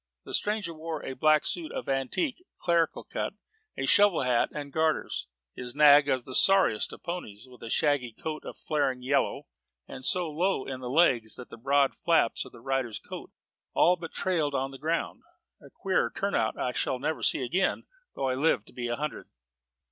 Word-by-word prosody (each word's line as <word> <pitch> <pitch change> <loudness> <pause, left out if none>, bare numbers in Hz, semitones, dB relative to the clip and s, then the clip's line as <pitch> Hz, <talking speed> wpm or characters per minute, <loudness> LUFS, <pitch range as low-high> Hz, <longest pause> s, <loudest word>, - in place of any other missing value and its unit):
The - - -9
stranger 205 -5 0
wore 160 -1 -6
a - - -4
black 155 +3 +3
suit 170 -3 -1
of - - -5
antique, 135 - -1
clerical 170 -2 +1
cut, - - -4 0.4
a - - -1
shovel 205 -8 +5
hat, 125 -2 +2
and 145 -2 -7
gaiters; 160 - 0 0.3
his 125 0 -3
nag 145 -1 +7
was 130 -2 +1
the 130 - -9
sorriest 190 - +5
of - - -12
ponies, 130 - -6
with 125 -1 -17
a 115 - -7
shaggy 140 -3 +1
coat 155 +7 -6
of - - -9
flaring 135 -5 -1
yellow, 140 +2 0 0.4
and 130 - -9
so 180 +5 +1
low 165 0 -1
in 130 -1 -5
the 125 -1 -6
legs 125 -7 +3
that 125 - -10
the - - -8
broad 140 +3 +2
flaps 165 -9 +1
of - - -13
its 115 - -15
rider's 130 -5 -1
coat - - -9 0.5
all 180 - +5
but 165 -2 -8
trailed 160 -7 -1
on 135 +1 -1
the 135 - -11
ground. 165 +3 -2 0.4
A - - -15
queerer 190 -2 0
turnout 195 - 0
I 125 - -1
shall 130 - -1
never 155 +5 -3
see - - +2
again, 180 +10 0 0.3
though 135 - -1
I 130 - +1
live 130 -5 +1
to - - -18
be 120 -1 -4
a 120 - -1
hundred. 150 +3 -5
145 Hz, 195 wpm, -28 LUFS, 130-165 Hz, 0.5 s, nag